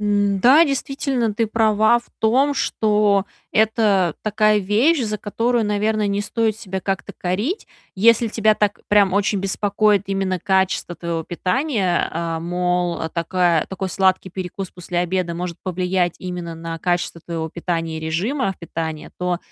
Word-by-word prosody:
Н-да, 205 - +4
действительно 270 -5 -1
ты 225 +1 +1
права 220 +1 +3
в 235 - -15
том, 265 +6 +3
что 210 -5 +2 0.3
это 210 -6 +2
такая 215 0 +3
вещь, 230 - +2
за 210 -2 -2
которую, 230 +3 0
наверное, 210 +1 0
не 200 0 -1
стоит 220 +1 0
себя 190 -4 -5
как-то 195 0 -3
корить. 210 - -2 0.3
Если 230 +3 +4
тебя 215 0 +2
так 205 -1 0
прям 205 -2 +4
очень 200 0 +1
беспокоит 200 +1 +1
именно 195 -1 -1
качество 190 -2 0
твоего 170 -1 -3
питания, 190 - 0
э, 165 0 -3
мол, 180 0 -1
такая 170 -1 +1
такой 190 0 -4
сладкий 190 0 +1
перекус 185 +1 -5
после 175 0 -5
обеда 180 -1 -1
может 175 -1 -5
повлиять 180 -1 0
именно 175 -2 -5
на 165 0 -6
качество 175 -1 -1
твоего 160 -1 -4
питания 165 -2 -3
и - - -7
режима 195 - -1
питания, 160 -2 -5
то, 180 -1 -1
195 Hz, 145 wpm, -21 LUFS, 180-215 Hz, 0.3 s, Н-да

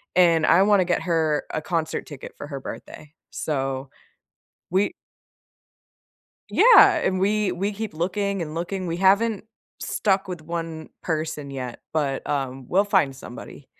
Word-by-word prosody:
and 165 -3 +5
I 170 +3 +5
want 205 -1 +4
to - - +1
get 175 - 0
her 160 -4 +1
a 155 - -1
concert 160 -1 -2
ticket 145 -4 -9
for - - -7
her 140 -2 -6
birthday. 150 +2 -9 0.2
So, 135 -2 -3 0.8
we 195 +2 +2 1.6
Yeah, 420 -5 +8
and 190 - 0
we 205 0 +1
we 195 +4 -2
keep 215 -1 -5
looking 195 +4 -1
and 155 -1 -5
looking, 180 +2 -3
we 170 0 -2
haven't 200 +3 +3 0.3
stuck 195 -1 0
with 180 -3 -6
one 165 0 -5
person 155 -3 -3
yet, 125 -3 -6
but, 145 -4 -1
um, 135 -2 -2
we'll 195 +3 +3
find 190 -10 +2
somebody. 125 - -10
170 Hz, 150 wpm, -24 LUFS, 150-195 Hz, 1.6 s, Yeah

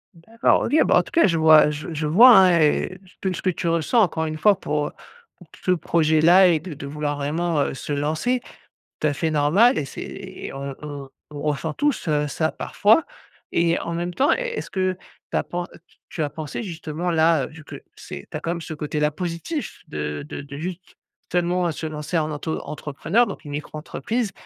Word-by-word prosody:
D'accord, 225 +9 +1
OK. - - 0
Bah - - +4
en - - +3
tout - - -14
cas, 335 - +5
je 170 -3 +1
vois, 155 -1 +7
heu, 150 - 0
je 150 +3 -6
je 150 0 -2
vois, 230 +11 +8
hein 180 -3 +6
et 155 +4 +1 0.2
tout 190 - 0
ce - - -5
que 185 - +2
tu 170 - -4
ressens, 170 +8 +2
encore 160 -5 +1
une 155 0 -4
fois, 200 +2 +4
pour, 150 -1 -1
heu, - - -8 0.6
t - - -16
ce 185 - +3
projet-là 170 +2 +4
et 165 -3 +3
de 165 0 -8
de 140 0 -8
vouloir 150 0 -3
vraiment, 155 +3 -1
heu, - - -1
se 145 - -5
lancer. 155 - 0 0.6
Tout 155 - +1
à 145 - +1
fait 160 +3 -1
normal 160 - +4
et 140 - -1
c'est 135 - -8
et 195 -1 -8
on 135 0 -6
on 145 -2 -7 0.2
on 145 -1 -8
ressent 150 +1 -1
tous, 290 - -1
heu, 150 -1 +1
ça, 155 +2 -1
parfois 220 +10 +2 0.5
et 170 0 +2
en 170 - -4
même 175 +1 -3
temps, 270 +10 +3
est - - -3
est-ce - - -5
que 185 -1 -1 0.3
tu - - 0
as - - +1
pen 175 0 -4
heu, - - -15
tu - - -29
tu 160 - -3
as 145 - -1
pensé 155 - -6
justement 165 -2 -4
là, 160 -2 +3
heu, - - -8
vu 160 0 -13
que - - -10 0.2
c'est 70 - -9
tu - - -4
as - - -9
quand 165 - -2
même 170 -1 -4
ce 160 - -6
côté-là 150 0 -1
positif, 175 - -5
de 75 - -4
de - - -6
de 140 0 -9
juste 180 +2 -7 0.3
tellement, 180 0 +1
heu, - - -1
se 160 - -6
lancer 150 +2 -3
en 155 -1 0
auto-entrepreneur, 160 +7 -1
donc 180 -6 -8
une 145 - -7
micro-entreprise 155 - -3
160 Hz, 225 wpm, -23 LUFS, 150-180 Hz, 0.6 s, vois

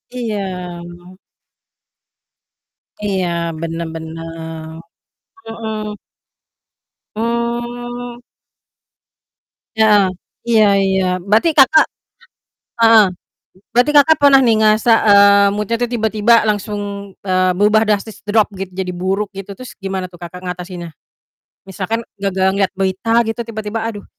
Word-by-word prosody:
Iya. 225 -4 -3 2.6
Iya, 190 -3 -1 0.3
bener 165 0 -4
bener. 160 0 -8 0.8
Mhm. 220 -2 -5 1.2
Mmm. 240 +1 -4 1.6
Heeh, 210 -2 +5 0.4
iya 220 -2 +5 0.2
iya. 190 -1 +1 0.2
Berarti 215 - +2
Kakak 305 +3 +6 1.0
heeh, 225 -1 +7 0.7
berarti 245 +5 +3
Kakak 290 +2 +6
pernah 280 -2 +6
nih 235 -4 +3
ngerasa, 215 +2 +3 0.2
eee, 200 0 +6
mood-nya 210 +2 -1
tuh 240 - -1
tiba-tiba 220 0 +2
langsung, 205 -1 -4
eee, 185 -1 +1
berubah 210 +2 +4
drastis, 210 +1 -1
drop 210 0 +2
gitu 190 0 -6
jadi 180 0 -4
buruk 190 +3 -1
gitu? 195 +1 -8
Terus 255 -1 -10
gimana 190 -2 -4
tuh 175 -1 -16
Kakak 175 +1 -8
ngatasinnya? 180 -1 -6 0.8
Misalkan 200 +4 -4 0.2
gara-gara 190 -1 +1
ngelihat 195 -1 0
berita 190 +3 -1
gitu 225 +2 -3
tiba-tiba, 220 0 -4
aduh 205 -3 -9
210 Hz, 105 wpm, -17 LUFS, 190-225 Hz, 2.6 s, heeh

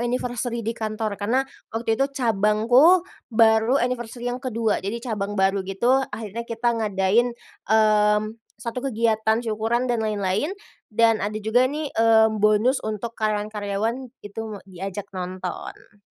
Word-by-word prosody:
anniversary 240 -1 -2
di 230 - -1
kantor, 215 -2 -4
karena 250 +6 +1 0.3
waktu 225 0 -1
itu 275 +3 +1
cabangku, 245 - +4 0.2
baru 220 +2 +4
anniversary 245 -1 -2
yang 250 - -5
kedua, 230 -4 -1
jadi 230 +4 -4
cabang 205 -1 -3
baru 195 0 +2
gitu. 240 +8 +2
Akhirnya 220 +1 -6
kita 235 +1 0
ngadain, 215 +4 +1 0.3
mmm, 210 -1 +4 0.4
1 235 +1 -4
kegiatan 220 -3 +1
syukuran 225 +3 0
dan 240 -2 0
lain-lain, 210 - -1 0.4
dan 225 0 +3
ada 210 +2 -2
juga 240 +4 +3
nih, 295 +1 -4
mmm, 220 -1 +4
bonus 215 +5 +3
untuk 215 +2 -4
karyawan-karyawan, 215 +3 -2 0.2
itu 205 +2 -6 0.2
diajak 195 +1 -6
nonton. 185 +2 -7
220 Hz, 130 wpm, -23 LUFS, 210-240 Hz, 0.4 s, cabangku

